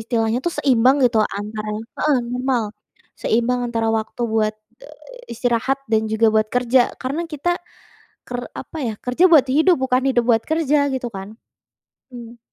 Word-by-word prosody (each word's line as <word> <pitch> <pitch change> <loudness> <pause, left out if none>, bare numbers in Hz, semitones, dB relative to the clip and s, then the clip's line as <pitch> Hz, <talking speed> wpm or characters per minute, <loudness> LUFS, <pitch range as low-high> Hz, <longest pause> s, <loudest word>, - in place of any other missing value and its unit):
istilahnya 225 0 0
tuh 345 - 0
seimbang 260 0 +4
gitu 240 -2 +3
antara 215 +1 -4 0.3
heeh, 300 -2 +3 0.2
normal. 250 -2 0 0.6
Seimbang 240 +2 +1
antara 225 -1 -1
waktu 220 +2 -4
buat, 220 -1 0 0.3
eee, - - -14
istirahat 245 +3 0
dan 220 -1 +2
juga 220 0 +3
buat 215 0 +2
kerja. 250 0 +2
Karena 290 +7 -3
kita 340 +3 -1 0.7
ker 245 0 -5
apa 320 - -8
ya, 225 -3 -2
kerja 250 +9 +1
buat 300 -6 +6
hidup, 320 +6 +4
bukan 260 -1 +1
hidup 240 -2 +1
buat 225 -1 +4
kerja, 300 -2 +1
gitu 255 -2 -3
kan? 195 +1 -8 0.8
Mmm. 235 -1 -11
245 Hz, 155 wpm, -20 LUFS, 225-270 Hz, 0.8 s, buat